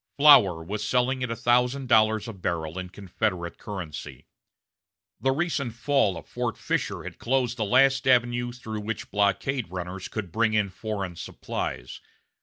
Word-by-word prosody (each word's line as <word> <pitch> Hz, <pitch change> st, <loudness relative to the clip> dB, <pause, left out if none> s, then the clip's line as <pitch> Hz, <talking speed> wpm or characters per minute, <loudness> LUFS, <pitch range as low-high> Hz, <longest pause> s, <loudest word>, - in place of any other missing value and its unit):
Flour 100 Hz, -, +7 dB
was 105 Hz, +5 st, -4 dB
selling 130 Hz, +1 st, +1 dB
at 125 Hz, -, -1 dB
a 115 Hz, -, -2 dB
thousand 125 Hz, +3 st, +1 dB
dollars 110 Hz, -2 st, +3 dB
a 115 Hz, -, -5 dB
barrel 85 Hz, -2 st, -3 dB
in 90 Hz, -1 st, -6 dB
Confederate 95 Hz, -2 st, -3 dB
currency. 95 Hz, -7 st, -7 dB, 0.9 s
The 135 Hz, -, +2 dB
recent 140 Hz, -5 st, -1 dB
fall 120 Hz, -, +1 dB
of 80 Hz, -, -9 dB
Fort -, -, -3 dB
Fisher -, -, -2 dB
had -, -, -9 dB
closed 125 Hz, -1 st, 0 dB
the 110 Hz, -3 st, -1 dB
last 135 Hz, +4 st, +4 dB
avenue 120 Hz, -1 st, +3 dB
through 110 Hz, -3 st, -6 dB
which 105 Hz, +1 st, -5 dB
blockade 105 Hz, +4 st, 0 dB
runners 90 Hz, +1 st, -5 dB
could 100 Hz, -6 st, -5 dB
bring 110 Hz, +1 st, +1 dB
in 105 Hz, -2 st, +1 dB
foreign 95 Hz, -3 st, -4 dB
supplies. 60 Hz, -5 st, -5 dB
110 Hz, 155 wpm, -26 LUFS, 95-125 Hz, 0.9 s, Flour